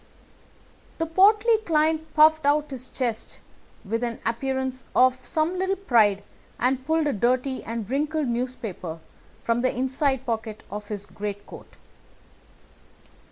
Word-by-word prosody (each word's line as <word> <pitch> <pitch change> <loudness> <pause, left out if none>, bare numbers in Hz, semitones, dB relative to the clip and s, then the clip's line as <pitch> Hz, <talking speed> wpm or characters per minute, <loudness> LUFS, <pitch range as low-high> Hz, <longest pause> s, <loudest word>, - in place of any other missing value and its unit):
The 325 - 0
portly 420 +7 +4
client 315 -4 0
puffed 315 0 +6
out 290 +1 +2
his 255 -1 -7
chest 235 -4 -4 0.5
with 225 +4 -2
an 235 -1 -3
appearance 260 +2 -2
of 255 0 +4
some 330 +4 -1
little 380 +1 +1
pride 220 - +3 0.3
and 255 +1 0
pulled 320 0 +2
a 290 - +1
dirty 255 +5 0
and 230 -2 -5
wrinkled 295 +3 -1
newspaper 235 -9 -4 0.5
from 230 +1 +1
the 255 - +2
inside 265 +1 -1
pocket 220 -2 -4
of 210 0 -6
his 205 -1 -5
greatcoat. 205 0 -8
260 Hz, 125 wpm, -25 LUFS, 230-310 Hz, 0.5 s, puffed